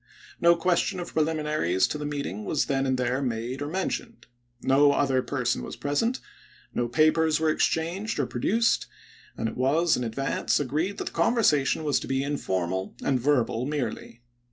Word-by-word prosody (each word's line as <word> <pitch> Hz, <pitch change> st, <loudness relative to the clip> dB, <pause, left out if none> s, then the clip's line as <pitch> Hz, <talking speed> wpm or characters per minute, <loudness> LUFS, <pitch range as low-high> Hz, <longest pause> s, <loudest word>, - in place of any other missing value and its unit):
No 170 Hz, 0 st, +5 dB
ques 175 Hz, 0 st, +2 dB
tion -, -, -2 dB
of 175 Hz, -, -6 dB
preliminaries 150 Hz, -, +1 dB
to 150 Hz, -, -3 dB
the 150 Hz, -, -3 dB
meeting 140 Hz, -8 st, -4 dB
was 145 Hz, +7 st, 0 dB
then 135 Hz, -1 st, 0 dB
and 130 Hz, 0 st, +1 dB
there 125 Hz, +1 st, 0 dB
made 125 Hz, +1 st, -3 dB
or 145 Hz, -, -2 dB
mentioned. 160 Hz, -7 st, -4 dB, 0.4 s
No 140 Hz, +2 st, +5 dB
other 135 Hz, -3 st, +2 dB
person 125 Hz, -1 st, -1 dB
was -, -, -7 dB
present; 225 Hz, -, -1 dB, 0.5 s
no 120 Hz, -, 0 dB
papers 155 Hz, +4 st, +3 dB
were 160 Hz, -1 st, +2 dB
exchanged 170 Hz, +8 st, -1 dB
or 140 Hz, -, +1 dB
produced; 225 Hz, -, +1 dB, 0.5 s
and 115 Hz, -, -1 dB
it 110 Hz, -, -5 dB
was, 155 Hz, +6 st, +2 dB
in 125 Hz, -, -2 dB
ad 115 Hz, -1 st, -4 dB
vance, 135 Hz, 0 st, 0 dB
agreed 155 Hz, +8 st, -1 dB
that -, -, -3 dB
the -, -, -5 dB
conversation 160 Hz, -, +2 dB
was 145 Hz, -3 st, +1 dB
to -, -, -7 dB
be 135 Hz, 0 st, 0 dB
informal 95 Hz, -10 st, -2 dB
and 135 Hz, -2 st, +1 dB
verbal 125 Hz, -2 st, +1 dB
merely. 130 Hz, -4 st, -4 dB
145 Hz, 180 wpm, -26 LUFS, 125-160 Hz, 0.5 s, No